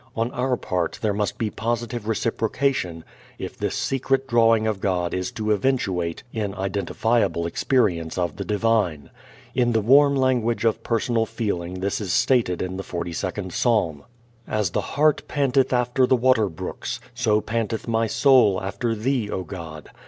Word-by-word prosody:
On 115 Hz, +2 st, -1 dB
our 125 Hz, -1 st, 0 dB
part 90 Hz, -3 st, -2 dB
there 105 Hz, -2 st, +2 dB
must 105 Hz, 0 st, -2 dB
be 110 Hz, -2 st, -2 dB
positive 120 Hz, -1 st, -3 dB
reciprocation 110 Hz, -, -1 dB, 0.3 s
if -, -, -6 dB
this -, -, -2 dB
secret 135 Hz, 0 st, 0 dB
drawing 115 Hz, -3 st, +4 dB
of 110 Hz, -3 st, -1 dB
God 90 Hz, -3 st, 0 dB
is 90 Hz, 0 st, -2 dB
to 110 Hz, -1 st, -1 dB
eventuate 95 Hz, -8 st, -1 dB
in 105 Hz, -3 st, -3 dB
identifiable 100 Hz, 0 st, 0 dB
experience 85 Hz, -4 st, 0 dB
of 90 Hz, -1 st, -1 dB
the -, -, -3 dB
Divine. 105 Hz, -9 st, 0 dB, 0.4 s
In 120 Hz, -1 st, +2 dB
the 115 Hz, -, +3 dB
warm 140 Hz, +5 st, +5 dB
language 125 Hz, -4 st, +1 dB
of 115 Hz, -, +1 dB
personal 115 Hz, 0 st, 0 dB
feeling 95 Hz, -6 st, -3 dB
this 100 Hz, +2 st, -1 dB
is 95 Hz, -4 st, -3 dB
stated 115 Hz, -9 st, +2 dB
in 95 Hz, 0 st, -4 dB
the -, -, -3 dB
Forty 85 Hz, -2 st, -4 dB
second 95 Hz, +1 st, -4 dB
Psalm: 95 Hz, -, +1 dB, 0.4 s
"As 105 Hz, -5 st, 0 dB
the 105 Hz, -, 0 dB
hart 150 Hz, +8 st, +1 dB
panteth 135 Hz, -2 st, +1 dB
after 125 Hz, +1 st, +2 dB
the 130 Hz, -, +4 dB
water 120 Hz, -4 st, +3 dB
brooks, 80 Hz, -, -5 dB
so 105 Hz, 0 st, +2 dB
panteth 110 Hz, +1 st, -3 dB
my 115 Hz, 0 st, +1 dB
soul 125 Hz, -7 st, +4 dB
after 100 Hz, +5 st, -2 dB
thee, 115 Hz, -1 st, -1 dB
O 95 Hz, -, -3 dB
God. 80 Hz, -5 st, -8 dB
110 Hz, 160 wpm, -23 LUFS, 95-120 Hz, 0.4 s, warm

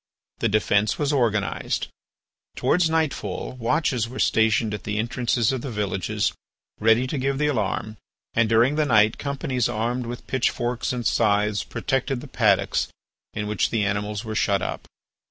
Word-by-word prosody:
The 115 Hz, -, +1 dB
defence 105 Hz, 0 st, +2 dB
was 145 Hz, -1 st, 0 dB
organised; 110 Hz, -7 st, 0 dB, 0.7 s
towards 170 Hz, -1 st, +2 dB
nightfall 155 Hz, -, -1 dB
watches 125 Hz, -2 st, 0 dB
were 130 Hz, -, -8 dB
stationed 110 Hz, -1 st, +2 dB
at 105 Hz, -, -5 dB
the 105 Hz, 0 st, -3 dB
entrances 115 Hz, +1 st, +1 dB
of 130 Hz, -2 st, -2 dB
the 135 Hz, -, -5 dB
villages 100 Hz, -4 st, -1 dB, 0.5 s
ready 115 Hz, +3 st, +4 dB
to 135 Hz, +2 st, -3 dB
give 135 Hz, +1 st, 0 dB
the 150 Hz, -, +1 dB
alarm; 110 Hz, -5 st, -1 dB, 0.4 s
and 115 Hz, -1 st, +2 dB
during 120 Hz, +6 st, +3 dB
the 155 Hz, -, +3 dB
night 110 Hz, -3 st, +4 dB
companies 135 Hz, -4 st, -1 dB
armed 120 Hz, +2 st, -2 dB
with 120 Hz, +1 st, -7 dB
pitchforks 125 Hz, -1 st, -1 dB
and 125 Hz, -2 st, -3 dB
scythes 105 Hz, 0 st, +2 dB
protected 135 Hz, -1 st, -2 dB
the 145 Hz, -, -9 dB
paddocks 110 Hz, -7 st, +2 dB, 0.5 s
in 105 Hz, -, -2 dB
which 105 Hz, -1 st, 0 dB
the 110 Hz, -2 st, 0 dB
animals 105 Hz, +2 st, -2 dB
were 110 Hz, -, -4 dB
shut 100 Hz, -3 st, +1 dB
up. -, -, -4 dB
115 Hz, 155 wpm, -24 LUFS, 105-130 Hz, 0.7 s, ready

